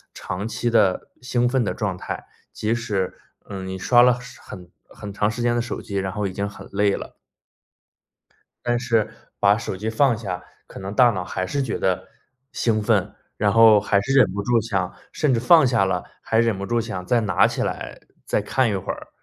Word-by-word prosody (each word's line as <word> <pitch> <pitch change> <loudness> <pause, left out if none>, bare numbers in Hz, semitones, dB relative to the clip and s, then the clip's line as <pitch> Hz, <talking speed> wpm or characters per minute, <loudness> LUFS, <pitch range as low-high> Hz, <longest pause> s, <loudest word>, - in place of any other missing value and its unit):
长 100 +5 -5
期 115 +2 -2
的 105 -5 +2
兴 125 -1 0
奋 130 -1 +1
的 105 - -1
状 95 -4 -2
态， - - -6 0.3
即 110 +2 -1
使， 105 -6 -2 0.3
嗯， 95 -2 -6
你 95 0 -5
刷 120 +5 +5
了 125 0 +4
时 125 +1 -12
很 90 -3 -11 0.2
很 100 -1 -9
长 105 +1 0
时 115 - -6
间 120 0 +2
的 120 - +1
手 120 - -5
机， 100 -2 -4
然 95 0 -2
后 105 +1 -2
已 95 - -4
经 100 +2 -3
很 100 - -12
累 100 0 +2
了。 - - -9 1.5
但 120 0 +1
是 115 -4 +1 0.3
把 100 +1 +4
手 110 - -4
机 105 +4 -4
放 120 +1 +3
下， 95 -5 -5 0.2
可 - - -11
能 95 +2 -6
大 120 +1 +6
脑 95 -4 -3
还 95 +1 -3
是 140 +9 -1
觉 120 - -3
得 95 0 -1 0.4
兴 110 -2 0
奋， 105 -2 +1 0.2
然 105 -1 +2
后 110 -2 +7
还 100 -1 +2
是 135 +7 -2
忍 130 -8 +5
不 100 +1 -3
住 120 0 +2
想 95 -5 -2 0.2
甚 150 -4 +1
至 115 - +1
放 155 +3 +6
下 120 -5 +3
了， 90 -2 -1 0.2
还 110 - 0
忍 115 -4 +1
不 100 - -4
住 120 0 +1
想 105 -5 -5
再 120 +3 +3
拿 105 -3 +3
起 - - -2
来 - - -4 0.3
再 - - +1
看 130 +3 +1
一 105 - -1
会 95 - -3
儿。 - - -11
110 Hz, 230 characters per minute, -23 LUFS, 100-120 Hz, 1.5 s, 后